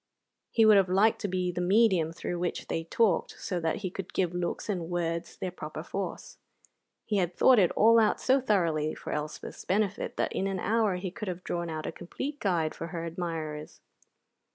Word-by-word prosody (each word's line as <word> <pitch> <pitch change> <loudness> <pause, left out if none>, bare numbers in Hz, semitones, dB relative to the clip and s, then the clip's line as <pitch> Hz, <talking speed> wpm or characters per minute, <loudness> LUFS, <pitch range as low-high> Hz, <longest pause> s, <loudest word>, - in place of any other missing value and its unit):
He 225 - +4
would 215 -1 +8
have 190 -2 +3
liked 200 +4 +3
to 205 - -1
be 180 -1 -1
the 180 - -3
medium 185 -4 +3
through 175 +1 -4
which 175 0 -3
they 165 - -2
talked, 220 +5 +1
so 180 - -2
that 165 -1 0
he 185 - -2
could 190 -1 -7
give 180 -2 +1
looks 175 -1 -3
and 180 -6 -2
words 170 -1 -2
their 185 - -3
proper 155 -3 -7
force. 195 +3 -5 0.7
He 210 - 0
had 180 -2 0
thought 255 -3 +6
it 180 -4 +5
all 230 +2 +6
out 215 -2 +3
so 265 +1 +3
thoroughly 165 -10 +1
for - - -6
Elspeth's 150 0 -5
benefit 200 0 -1
that - - 0
in 195 - -1
an 195 -1 -2
hour 215 0 +1
he 180 0 -4
could 215 +2 -6
have 180 -1 -4
drawn 170 -1 -3
out 155 -1 -4
a - - -2
complete 280 +11 -6
guide 170 -6 0
for 165 - -6
her 170 -1 -5
admirers. 160 -3 -5
180 Hz, 200 wpm, -29 LUFS, 170-205 Hz, 0.7 s, would